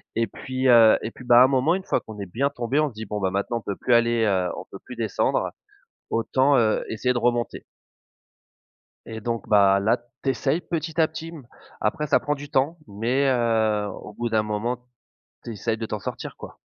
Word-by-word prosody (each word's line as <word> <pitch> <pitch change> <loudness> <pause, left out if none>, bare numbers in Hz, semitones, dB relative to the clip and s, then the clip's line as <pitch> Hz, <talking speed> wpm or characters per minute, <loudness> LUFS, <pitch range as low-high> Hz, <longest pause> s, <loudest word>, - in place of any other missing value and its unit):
et 115 +1 +2
puis 130 +4 -3
heu 115 -2 +7
et 115 - -4
puis, - - -13
bah, 120 0 +6
à - - +10
un - - +6
moment, 135 +5 +2
une 190 - -4
fois - - 0
qu'on 110 -2 -11
est 100 - -4
bien 140 +4 +1
tombé, 130 +1 -1
on 155 - +2
se 125 - -15
dit: 110 +1 -6
«Bon 105 +1 -4
maintenant, 100 +5 -2
on 115 - -6
peut 100 - -4
plus 125 - 0
aller 115 -1 +3
heu, 95 -4 +1
on - - -7
peut - - -9
plus - - -9
descendre - - 0 0.6
autant, 130 +5 +2
heu, 110 -3 +2
essayer 125 +3 0
de 120 - -2
remonter». 120 0 -1 1.4
Et 110 0 -7
donc, 115 +1 -4
bah, 100 -2 +5
là 110 +4 +2 0.2
tu 135 - +1
essayes 145 +5 0
petit 165 -1 -4
à 160 - +5
petit, 160 +1 -7
mmh, 150 -7 -11 0.3
après 150 +8 -1
ça - - +3
prend 145 - -1
du 145 0 -10
temps, 145 +6 +1
mais, 120 +7 0
heu, 110 -4 +1
au 100 +2 -9
bout 120 +2 -3
d'un 110 -1 +2
moment, 105 +3 -2 0.7
tu 120 - -6
essayes 110 +1 -2
de 115 - -4
t'en 105 -1 -4
sortir, - - -6
quoi. - - -11
120 Hz, 220 wpm, -24 LUFS, 110-135 Hz, 1.4 s, à